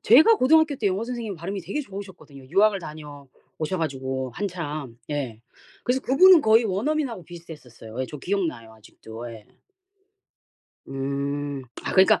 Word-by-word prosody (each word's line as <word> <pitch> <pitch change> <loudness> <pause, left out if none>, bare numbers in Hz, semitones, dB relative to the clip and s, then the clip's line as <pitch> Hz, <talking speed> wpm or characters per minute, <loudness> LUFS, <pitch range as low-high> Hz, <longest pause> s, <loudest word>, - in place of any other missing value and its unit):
제가 310 - +7
고등학교 315 +1 +4
때 220 - -1
영어 195 +4 -1
선생님 235 -5 -4
발음이 190 +4 -4
되게 195 - -3
좋으셨거든요, 190 - -10
유학을 200 +3 +4
다녀오셔 150 +1 -7
가지고 130 -4 -2
한참. 155 - -4
예. 130 -7 -3 0.4
그래서 255 +2 +1
그분은 340 +7 +7
거의 225 0 +5
원어민하고 230 - -1
비슷했었어요. 140 -9 -10
예. 130 - -1
저 150 - -7
기억 195 +6 0
나요 115 -6 -7
아직도. 110 +2 -10
예. 110 -2 -12 1.4
음. 140 +1 -3 0.2
아 - - -3
그러니까 190 0 +5
165 Hz, 350 characters per minute, -25 LUFS, 135-215 Hz, 1.4 s, 제가